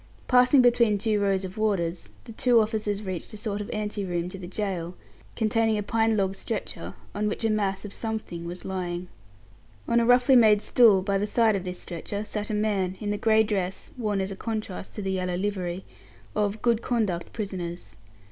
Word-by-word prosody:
Passing 250 Hz, +1 st, +6 dB
between 235 Hz, -3 st, +4 dB
two 215 Hz, 0 st, +1 dB
rows 195 Hz, -1 st, +1 dB
of 190 Hz, +4 st, -8 dB
warders, 180 Hz, -5 st, -1 dB
the 230 Hz, -, -10 dB
two 240 Hz, +1 st, +4 dB
officers 215 Hz, -1 st, -1 dB
reached 185 Hz, -4 st, -5 dB
a -, -, -7 dB
sort 205 Hz, -1 st, -3 dB
of 205 Hz, -, -6 dB
ante 210 Hz, -1 st, -3 dB
room 175 Hz, -1 st, -2 dB
to 195 Hz, -, -8 dB
the 180 Hz, -, -7 dB
gaol, 185 Hz, -3 st, -3 dB, 0.4 s
containing 225 Hz, 0 st, +2 dB
a 210 Hz, -, -1 dB
pine 225 Hz, +1 st, +1 dB
log 190 Hz, -1 st, +1 dB
stretcher, -, -, -5 dB, 0.2 s
on 210 Hz, +1 st, -1 dB
which 210 Hz, +2 st, -2 dB
a 220 Hz, -, +3 dB
mass 200 Hz, -2 st, -1 dB
of 205 Hz, -, -6 dB
something 215 Hz, -7 st, -4 dB
was 175 Hz, +1 st, -7 dB
lying. 180 Hz, -2 st, -4 dB, 0.8 s
On 235 Hz, -, +3 dB
a 235 Hz, -, +2 dB
roughly 245 Hz, +2 st, +6 dB
made 215 Hz, -3 st, +6 dB
stool, 215 Hz, -6 st, +5 dB
by 200 Hz, 0 st, +1 dB
the 205 Hz, -, -1 dB
side 225 Hz, -1 st, +3 dB
of 190 Hz, -1 st, -3 dB
this 180 Hz, 0 st, -4 dB
stretcher, 200 Hz, +4 st, -5 dB
sat 210 Hz, 0 st, -4 dB
a 215 Hz, -, -1 dB
man, 200 Hz, -3 st, 0 dB
in 205 Hz, -1 st, -2 dB
the 205 Hz, -, -1 dB
grey 220 Hz, 0 st, +4 dB
dress 195 Hz, -3 st, -3 dB
(worn 210 Hz, -6 st, -1 dB
as 190 Hz, +1 st, -3 dB
a -, -, -5 dB
contrast 215 Hz, -3 st, -5 dB
to 210 Hz, -, -4 dB
the 190 Hz, -, -1 dB
yellow 185 Hz, -1 st, -1 dB
livery) 185 Hz, -2 st, -3 dB, 0.5 s
of 210 Hz, 0 st, -1 dB
"good 235 Hz, -2 st, +3 dB
conduct" 210 Hz, -9 st, -1 dB
prisoners. 180 Hz, -5 st, -5 dB
205 Hz, 200 wpm, -26 LUFS, 190-220 Hz, 0.8 s, Passing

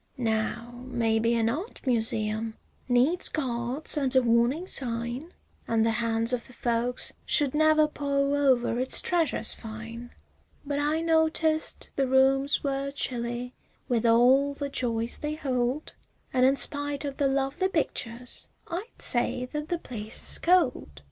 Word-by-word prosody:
Now 235 Hz, +1 st, -2 dB
maybe 230 Hz, -1 st, +1 dB
an 225 Hz, -1 st, +2 dB
art 320 Hz, -, -4 dB
museum 220 Hz, -2 st, -1 dB, 0.3 s
needs 255 Hz, +9 st, +3 dB
guards 255 Hz, +1 st, -2 dB
and 270 Hz, -3 st, +1 dB
a 260 Hz, -, +6 dB
warning 240 Hz, +8 st, +2 dB
sign 245 Hz, +2 st, -2 dB, 0.4 s
An' 225 Hz, -1 st, +2 dB
the 225 Hz, -, +2 dB
hands 230 Hz, +1 st, 0 dB
of 245 Hz, -, -2 dB
the 250 Hz, -, -14 dB
folks 240 Hz, +1 st, -1 dB
should 285 Hz, -3 st, +2 dB
never 310 Hz, 0 st, +4 dB
paw 280 Hz, -1 st, 0 dB
over 260 Hz, -4 st, +2 dB
its 260 Hz, +1 st, +4 dB
treasures 340 Hz, -3 st, 0 dB
fine; 230 Hz, +2 st, -8 dB, 0.6 s
But 285 Hz, 0 st, -2 dB
I 300 Hz, +2 st, +1 dB
noticed 320 Hz, -1 st, +1 dB
the 270 Hz, -1 st, +2 dB
rooms 270 Hz, +2 st, +3 dB
were 275 Hz, 0 st, -1 dB
chilly 245 Hz, -2 st, -3 dB, 0.3 s
with 240 Hz, -2 st, +1 dB
all 260 Hz, +5 st, +4 dB
the 285 Hz, 0 st, -4 dB
joys 235 Hz, -3 st, -2 dB
they 300 Hz, 0 st, -3 dB
hold, 260 Hz, 0 st, -2 dB, 0.4 s
An' 255 Hz, 0 st, +4 dB
in 270 Hz, +1 st, +4 dB
spite 290 Hz, 0 st, 0 dB
of 275 Hz, -1 st, -5 dB
the 280 Hz, -, +2 dB
lovely 275 Hz, +6 st, 0 dB
pictures, 245 Hz, -8 st, -3 dB, 0.2 s
I'd 375 Hz, +7 st, -5 dB
say 250 Hz, +1 st, +2 dB
that 300 Hz, 0 st, -4 dB
the 345 Hz, -, -1 dB
place 220 Hz, -8 st, -7 dB
is -, -, +1 dB
cold. 300 Hz, -, +1 dB
255 Hz, 145 wpm, -27 LUFS, 235-290 Hz, 0.6 s, a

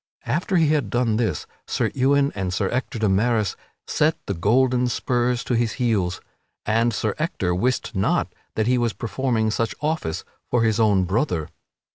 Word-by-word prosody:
After 170 Hz, +9 st, 0 dB
he 160 Hz, -3 st, +4 dB
had 145 Hz, -8 st, +1 dB
done 120 Hz, -1 st, +1 dB
this 110 Hz, -10 st, -1 dB, 0.2 s
Sir -, -, 0 dB
Ewain 140 Hz, +2 st, +3 dB
and 95 Hz, -2 st, -2 dB
Sir 95 Hz, +2 st, 0 dB
Ector 125 Hz, -1 st, -2 dB
de 110 Hz, -1 st, +1 dB
Maris 105 Hz, +1 st, +1 dB, 0.3 s
set 155 Hz, +1 st, +1 dB
the 100 Hz, -, -2 dB
golden 125 Hz, +7 st, +2 dB
spurs 120 Hz, 0 st, 0 dB
to -, -, -2 dB
his 115 Hz, -1 st, +1 dB
heels, 100 Hz, -8 st, 0 dB, 0.4 s
and 115 Hz, +2 st, +2 dB
Sir 105 Hz, -1 st, -1 dB
Ector 100 Hz, -, -1 dB
wist 120 Hz, +7 st, 0 dB
not 95 Hz, -, +1 dB, 0.2 s
that 110 Hz, -, +1 dB
he 125 Hz, +1 st, +2 dB
was 120 Hz, -3 st, 0 dB
performing 110 Hz, +2 st, -1 dB
such 115 Hz, +1 st, -1 dB
office 150 Hz, -, -2 dB, 0.3 s
for 120 Hz, -2 st, +2 dB
his 110 Hz, 0 st, +2 dB
own 105 Hz, -4 st, +4 dB
brother. 90 Hz, -, -1 dB
115 Hz, 170 wpm, -23 LUFS, 100-125 Hz, 0.4 s, he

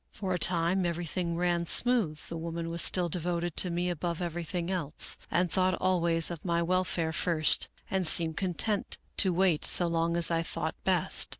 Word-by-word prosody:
For 190 Hz, -2 st, -4 dB
a 180 Hz, -, -1 dB
time 175 Hz, +2 st, +2 dB
everything 170 Hz, 0 st, -2 dB
ran 175 Hz, -1 st, 0 dB
smooth, 230 Hz, -11 st, +2 dB
the 170 Hz, -, -6 dB
woman 165 Hz, 0 st, -5 dB
was 170 Hz, 0 st, +1 dB
still 180 Hz, -2 st, +3 dB
devoted 175 Hz, 0 st, -2 dB
to 180 Hz, -, +3 dB
me 175 Hz, +1 st, -1 dB
above 170 Hz, -1 st, -3 dB
everything 175 Hz, 0 st, -4 dB
else, 165 Hz, -6 st, -2 dB
and 180 Hz, 0 st, 0 dB
thought 185 Hz, -1 st, +2 dB
always 170 Hz, -2 st, +2 dB
of 165 Hz, -3 st, -7 dB
my 170 Hz, -2 st, 0 dB
welfare 175 Hz, -2 st, 0 dB
first 160 Hz, -1 st, +2 dB, 0.2 s
and 190 Hz, -3 st, -1 dB
seemed 160 Hz, -1 st, +2 dB
content 195 Hz, +3 st, -2 dB, 0.2 s
to 190 Hz, -, +4 dB
wait 175 Hz, -3 st, +1 dB
so 175 Hz, -, +3 dB
long 170 Hz, 0 st, 0 dB
as 170 Hz, 0 st, +4 dB
I 165 Hz, 0 st, +1 dB
thought 165 Hz, -, -3 dB
best. -, -, +2 dB
170 Hz, 180 wpm, -29 LUFS, 165-180 Hz, 0.2 s, to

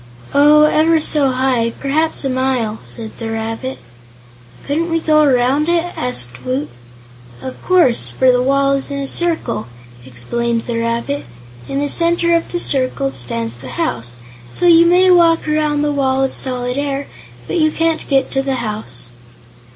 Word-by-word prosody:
"Oh, 295 Hz, +2 st, +6 dB
ever 315 Hz, +2 st, +3 dB
so 295 Hz, -3 st, +1 dB
high; 255 Hz, -3 st, 0 dB
perhaps 305 Hz, +2 st, -1 dB
a -, -, 0 dB
mile," 255 Hz, -4 st, -1 dB
said 220 Hz, -2 st, -9 dB
the 225 Hz, -1 st, -4 dB
rabbit. 225 Hz, +4 st, -4 dB, 0.9 s
"Couldn't 320 Hz, +4 st, -1 dB
we 330 Hz, 0 st, +1 dB
go 310 Hz, -1 st, +3 dB
around 275 Hz, +2 st, +2 dB
it?" 345 Hz, 0 st, 0 dB
asked 125 Hz, -, -5 dB
Woot. 130 Hz, +4 st, -2 dB, 0.7 s
"Of 260 Hz, -, -8 dB
course, 350 Hz, -10 st, +3 dB
for 260 Hz, -1 st, +3 dB
the 250 Hz, 0 st, +2 dB
wall 275 Hz, +1 st, +2 dB
is 275 Hz, 0 st, -1 dB
a 280 Hz, -1 st, -3 dB
circle," 325 Hz, -, -2 dB, 0.4 s
explained 230 Hz, -, -2 dB
the 235 Hz, -1 st, -2 dB
rabbit. 235 Hz, +5 st, -2 dB, 0.4 s
"In 275 Hz, -, -3 dB
the 290 Hz, +1 st, 0 dB
center 340 Hz, +2 st, +2 dB
of 335 Hz, -, -2 dB
the 350 Hz, -, -2 dB
circle 255 Hz, -, +1 dB
stands 120 Hz, -2 st, -4 dB
the 130 Hz, 0 st, -9 dB
house, 120 Hz, 0 st, -3 dB, 0.4 s
so -, -, -1 dB
you 335 Hz, -1 st, +6 dB
may 365 Hz, +2 st, +5 dB
walk 335 Hz, -2 st, +4 dB
around 300 Hz, -1 st, 0 dB
the 295 Hz, -, 0 dB
Wall 270 Hz, -2 st, +1 dB
of 270 Hz, -, -1 dB
Solid 250 Hz, 0 st, -2 dB
Air, 280 Hz, -1 st, -2 dB, 0.4 s
but 355 Hz, -, -2 dB
you 310 Hz, -1 st, +3 dB
can't 325 Hz, +1 st, -1 dB
get 270 Hz, -2 st, +1 dB
to 270 Hz, -, 0 dB
the 270 Hz, -1 st, -2 dB
house." 215 Hz, -, -6 dB
270 Hz, 165 wpm, -17 LUFS, 230-310 Hz, 0.9 s, Oh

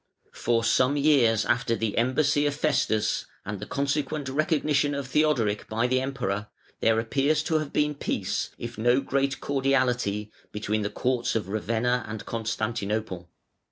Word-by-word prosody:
] -, -, -39 dB
For 115 Hz, -1 st, 0 dB
some 130 Hz, +4 st, +3 dB
years 135 Hz, -7 st, +4 dB
after 120 Hz, -2 st, +1 dB
the 110 Hz, -2 st, -2 dB
embassy 145 Hz, +4 st, +2 dB
of 145 Hz, -, -1 dB
Festus 140 Hz, -8 st, 0 dB, 0.2 s
(497) 105 Hz, -, -5 dB
and 100 Hz, -, -5 dB
the -, -, -6 dB
consequent 140 Hz, 0 st, -1 dB
recognition 145 Hz, 0 st, +1 dB
of 140 Hz, -1 st, -3 dB
Theodoric 130 Hz, -7 st, +1 dB
by 115 Hz, +2 st, 0 dB
the 130 Hz, +1 st, +2 dB
Emperor, 105 Hz, -7 st, -2 dB, 0.3 s
there 110 Hz, 0 st, +3 dB
appears 140 Hz, +7 st, +1 dB
to 160 Hz, 0 st, +1 dB
have 155 Hz, -2 st, -5 dB
been 150 Hz, 0 st, +1 dB
peace, 140 Hz, -, -2 dB
if 120 Hz, -1 st, -7 dB
no 120 Hz, +3 st, +4 dB
great 140 Hz, +1 st, 0 dB
cordiality, 125 Hz, -7 st, 0 dB, 0.2 s
between 105 Hz, +1 st, -1 dB
the 100 Hz, -, -1 dB
courts 120 Hz, +3 st, -1 dB
of 105 Hz, -4 st, -1 dB
Ravenna 115 Hz, +3 st, 0 dB
and 110 Hz, -1 st, -6 dB
Constantinople. 110 Hz, -5 st, -3 dB
125 Hz, 155 wpm, -26 LUFS, 110-140 Hz, 0.3 s, years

